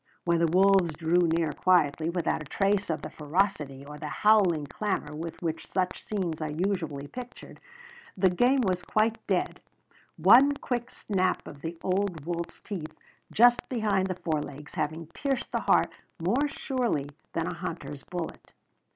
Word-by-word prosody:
When 170 -1 +2
the 165 -1 +3
wolves 190 -2 +4
drew 170 +3 +2
near 165 -2 +1
quietly, 160 -2 +2
without 170 -2 -1
a - - -7
trace 200 +2 +1
of 160 - -2
the - - -6
ferocity 150 -4 -1
or 150 +1 -9
the 150 - -5
howling 185 -5 +3
clamor 150 -1 -3
with 165 +1 -6
which 165 -1 -3
such 185 -1 -2
scenes 180 -7 -3
are 155 - -2
usually 160 -4 -2
pictured, 245 - -10 0.6
the 185 -1 +4
game 250 +8 +3
was 185 -5 0
quite 220 +4 +1
dead, - - 0 0.6
one 280 +4 +7
quick 245 -3 -3
snap 185 -3 -1
of 140 - -10
the 165 +2 -5
old 185 -5 -1
wolf's 170 0 -4
teeth 170 -7 -6 0.3
just 240 +2 +5
behind 210 -6 +1
the 185 - -2
fore 160 -4 -1
legs 145 +1 -9
having 160 +2 -2
pierced 265 - -3
the - - -1
heart - - +3 0.3
more 235 - +1
surely 250 - -1 0.3
than 165 - -1
a - - -3
hunter's 160 -5 -6
bullet. 175 0 -7
175 Hz, 160 wpm, -28 LUFS, 155-205 Hz, 0.6 s, one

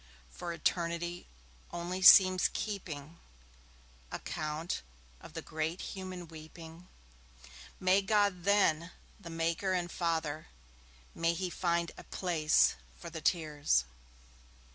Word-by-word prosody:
For 170 - -5
Eternity 170 +1 -2 0.4
only 175 +2 -4
seems 185 0 +8
keeping 170 -7 -5 0.9
Account 155 +2 -3 0.4
of - - -13
the - - -5
great 160 +3 -3
human 185 -2 -7
weeping; 160 +2 -12 0.9
May 185 +2 +4
God 200 -3 +2
then, 180 -4 +3 0.3
the 170 - -10
Maker 165 +3 0
and 175 -1 -1
Father, 160 -3 -2 0.7
May 165 0 +1
He 185 0 -3
find 170 -1 0
a - - -10
place 165 -4 +2 0.2
for 170 - -9
the 160 0 -6
tears! 150 - +2
170 Hz, 105 wpm, -32 LUFS, 160-185 Hz, 0.9 s, seems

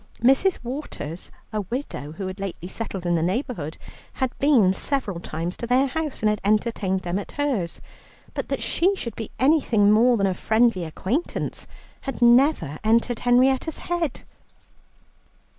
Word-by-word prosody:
Mrs. 270 +10 +4
Waters, 235 - -5 0.2
a 215 - 0
widow, 200 - -5
who 190 +4 -5
had 185 +1 -6
lately 190 -3 -5
settled 195 -2 -5
in 175 - +2
the 165 - +2
neighbourhood, 180 - -2 0.4
had 260 -2 -1
been 245 -10 +5
several 210 -6 -1
times 170 +2 -4
to 235 - -5
their 255 +3 +4
house 300 +1 -3
and 215 - +4
had 210 - -3
entertained 205 -2 +1
them 180 +2 -1
at 205 - -8
hers, 260 -13 -1 0.5
but - - -4
that - - -2
she 380 +4 +2
should 235 - -5
be 225 - -6
anything 255 -8 +4
more 235 +3 +5
than 200 - +2
a 190 - +1
friendly 220 -1 +2
acquaintance 210 - -3 0.3
had 270 - -5
never 240 - +4
entered 230 +2 +2
Henrietta's 260 +5 +3
head. 340 -5 -2
230 Hz, 155 wpm, -24 LUFS, 185-265 Hz, 0.5 s, been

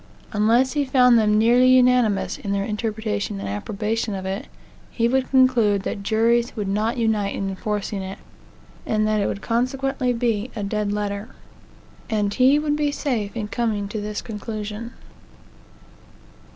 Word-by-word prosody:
Unless 230 +5 +3
he 295 -1 +1
found 250 -3 +5
them 210 -1 +3
nearly 240 +3 +5
unanimous 250 -5 +3
in 200 - -3
their 200 0 0
interpretation 210 -1 -3
and - - -5
approbation 210 - -2
of 190 -1 -5
it, 190 +2 -4 0.4
he 230 -1 0
would 260 +2 0
conclude 240 -7 +3
that 200 - -4
juries 230 +3 +1
would 210 -3 -3
not 215 +5 0
unite 220 -4 0
in 195 - -2
enforcing 205 0 -3
it, 190 +1 -6 0.7
and 215 -1 0
that 215 -1 +1
it - - +1
would 200 - -4
consequently 255 +2 0
be 230 -1 -1
a 210 - -3
dead 205 0 -1
letter. 205 +1 -3 0.8
And 205 -2 0
he 260 +5 +4
would 295 0 0
be 295 -1 0
safe 235 -8 -2
in 210 -2 -3
coming 215 -3 -1
to 215 0 -4
this 210 0 -4
conclusion. 215 +1 -6
220 Hz, 155 wpm, -22 LUFS, 205-245 Hz, 0.8 s, found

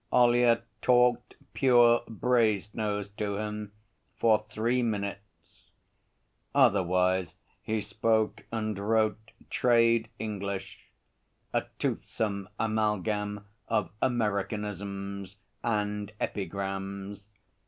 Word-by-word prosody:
Ollyett 120 -1 +4 0.2
talked 125 -1 +3 0.2
pure 120 -3 +5
Brasenose 105 -3 0
to 100 -2 -2
him 105 -1 -4 0.4
for 110 -2 +3
three 115 +3 +1
minutes. 100 -3 -5 0.9
Otherwise 95 -7 +3 0.3
he 110 -1 -1
spoke 110 +1 0
and 110 -3 -2
wrote 110 +1 +1 0.2
trade 115 -2 +3
English 100 -3 -5 0.7
a - - +1
toothsome 100 -3 -2
amalgam 105 -1 0 0.2
of 105 - 0
Americanisms 100 -3 -2 0.3
and 105 -2 -1
epigrams. 100 +1 -4
105 Hz, 80 wpm, -29 LUFS, 100-115 Hz, 0.9 s, pure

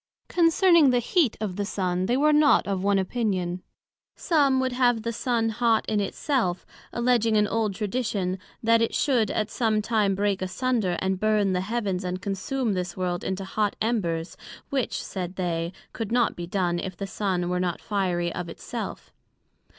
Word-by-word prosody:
Concerning 340 -2 +5
the 250 - +3
heat 245 - +1
of 205 -4 -3
the 205 - 0
Sun, 185 -2 -1
they 245 - +2
were 300 +2 +4
not 300 0 +5
of 195 -2 -1
one 200 0 +3
opinion; 185 -3 -1 0.5
some 280 -5 +2
would 260 0 0
have 245 -3 +2
the 230 0 -2
Sun 230 -1 0
hot 225 0 +2
in 215 -1 +1
it 200 - -2
self, 230 -12 -1 0.3
alledging 235 -2 +2
an 210 - +4
old 215 -2 -1
Tradition, 205 -4 -2 0.2
that 230 0 +4
it 230 - 0
should 245 -8 +2
at 215 0 -1
some 220 -3 +1
time 210 -2 +1
break 200 -1 0
asunder, 205 -1 0
and 190 0 0
burn 210 -2 +2
the 180 - 0
Heavens, 200 -3 -2
and 180 0 -3
consume 205 +5 -2
this 180 0 -3
world 180 -1 -2
into 190 0 -3
hot 205 +1 -1
Embers, 175 -8 -1 0.4
which, 270 -3 -1
said 185 -1 -5
they, 170 -2 -2 0.2
could 225 -2 -4
not 240 -1 +2
be 175 0 -6
done, 175 -2 0
if 185 -1 -5
the 200 - -3
Sun 190 -3 -1
were 180 0 0
not 180 -2 -1
fiery 180 -5 -1
of 175 -1 -5
it - - -10
self. - - -6
205 Hz, 180 wpm, -26 LUFS, 185-235 Hz, 0.5 s, Concerning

